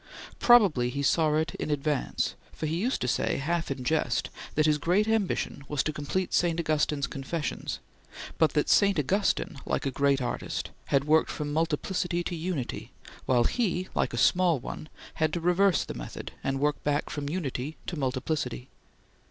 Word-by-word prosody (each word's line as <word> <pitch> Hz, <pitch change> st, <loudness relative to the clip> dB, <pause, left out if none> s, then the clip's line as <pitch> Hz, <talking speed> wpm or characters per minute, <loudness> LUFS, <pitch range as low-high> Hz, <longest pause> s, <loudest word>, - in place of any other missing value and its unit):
Probably 195 Hz, -, +5 dB
he 140 Hz, +3 st, -3 dB
saw 155 Hz, +2 st, +3 dB
it 155 Hz, +1 st, 0 dB
in -, -, -3 dB
advance, 145 Hz, -1 st, 0 dB, 0.2 s
for -, -, -4 dB
he 155 Hz, +1 st, -1 dB
used 250 Hz, +5 st, 0 dB
to 125 Hz, -, 0 dB
say, -, -, +1 dB
half 165 Hz, +4 st, -1 dB
in 135 Hz, -2 st, -3 dB
jest, 160 Hz, +5 st, 0 dB, 0.2 s
that 155 Hz, -, +3 dB
his 150 Hz, -1 st, +3 dB
great 185 Hz, +8 st, +2 dB
ambition 215 Hz, -9 st, 0 dB
was 145 Hz, -2 st, 0 dB
to 155 Hz, -, -2 dB
complete 155 Hz, +5 st, -2 dB
St. 170 Hz, -1 st, +2 dB
Augustine's 150 Hz, -3 st, +1 dB
"Confessions," 140 Hz, +5 st, -4 dB, 0.6 s
but 160 Hz, -, +4 dB
that 150 Hz, -, +1 dB
St. 200 Hz, -2 st, +4 dB
Augustine, 185 Hz, -1 st, 0 dB
like -, -, -2 dB
a 135 Hz, -, 0 dB
great 140 Hz, 0 st, +2 dB
artist, 125 Hz, -, -3 dB
had 140 Hz, -1 st, +2 dB
worked 155 Hz, +2 st, +3 dB
from 145 Hz, -1 st, -3 dB
multiplicity 170 Hz, +3 st, 0 dB
to 175 Hz, -, -3 dB
unity, 160 Hz, -6 st, -4 dB, 0.4 s
while 125 Hz, -2 st, +4 dB
he, 185 Hz, -, 0 dB
like -, -, 0 dB
a -, -, -4 dB
small 180 Hz, -3 st, +4 dB
one, 155 Hz, +4 st, -7 dB, 0.3 s
had 155 Hz, -1 st, +3 dB
to 175 Hz, -, 0 dB
reverse 180 Hz, +1 st, +3 dB
the -, -, -6 dB
method -, -, -7 dB
and 135 Hz, 0 st, -1 dB
work 150 Hz, +1 st, 0 dB
back 145 Hz, 0 st, 0 dB
from 145 Hz, -1 st, -3 dB
unity 150 Hz, -3 st, -3 dB
to 175 Hz, -, -4 dB
multiplicity. 130 Hz, -2 st, -2 dB
155 Hz, 175 wpm, -28 LUFS, 140-175 Hz, 0.6 s, Probably